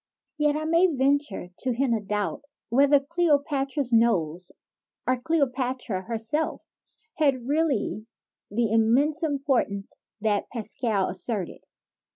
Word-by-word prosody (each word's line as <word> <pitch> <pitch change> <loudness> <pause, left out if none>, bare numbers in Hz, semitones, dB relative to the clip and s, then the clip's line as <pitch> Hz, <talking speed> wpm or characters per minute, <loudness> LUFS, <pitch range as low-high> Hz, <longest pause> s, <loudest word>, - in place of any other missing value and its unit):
Yet 295 -1 +3
I 310 +1 -2
may 335 +3 +4
venture 275 - 0
to 255 -1 -1
hint 250 -1 +2
a - - -1
doubt 205 +1 -2 0.3
whether 280 +4 +5
Cleo 330 +1 +2
patra's 275 -2 -2
nose 180 -7 +2 0.5
or 255 - +2
Cleopatra 255 - -1
herself, 230 +7 -2 0.5
had 275 -5 +2
really 280 -7 0 0.4
the 225 +1 0
immense 260 +8 +3
importance 270 -10 -1 0.2
that 210 -1 0
Pascal 220 -3 -1
asserted. 190 +1 -3
255 Hz, 115 wpm, -26 LUFS, 220-290 Hz, 0.5 s, whether